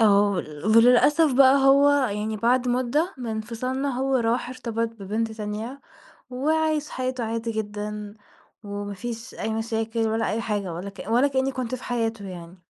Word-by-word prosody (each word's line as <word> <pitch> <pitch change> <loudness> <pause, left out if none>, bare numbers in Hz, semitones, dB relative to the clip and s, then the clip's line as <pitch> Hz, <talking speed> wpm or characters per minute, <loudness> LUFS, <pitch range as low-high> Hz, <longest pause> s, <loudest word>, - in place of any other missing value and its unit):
آه، 205 -2 +5
ول 155 -6 -5
وللأسف 255 +6 +5
بقى 270 +1 +7
هو 280 +1 +6
يعني 220 -6 0
بعد 245 +3 +2
مُدة 255 +8 0
من 250 - -5
انفصالنا 240 +5 -3
هو 270 0 +2
راح 235 0 0
ارتبط 230 -3 -3
ببنت 220 +1 -3
تانية 220 +5 -5 0.5
وعايش 310 +3 0
حياته 255 -1 -3
عادي 230 +1 -3
جدًا، 210 -1 -5 0.5
وما 205 0 -5
فيش 235 +3 -7
أي 220 - -3
مشاكل 225 0 -2
ولا 225 -1 0
أي 220 +2 -1
حاجة 205 -5 -2
ولا 180 +4 -5
كأ 195 - -10
ولا 245 +5 +4
كأني 265 0 0
كنت 255 -2 -3
في 255 - -8
حياته 225 -4 -2
يعني. 175 0 -10
230 Hz, 160 wpm, -25 LUFS, 210-255 Hz, 0.5 s, بقى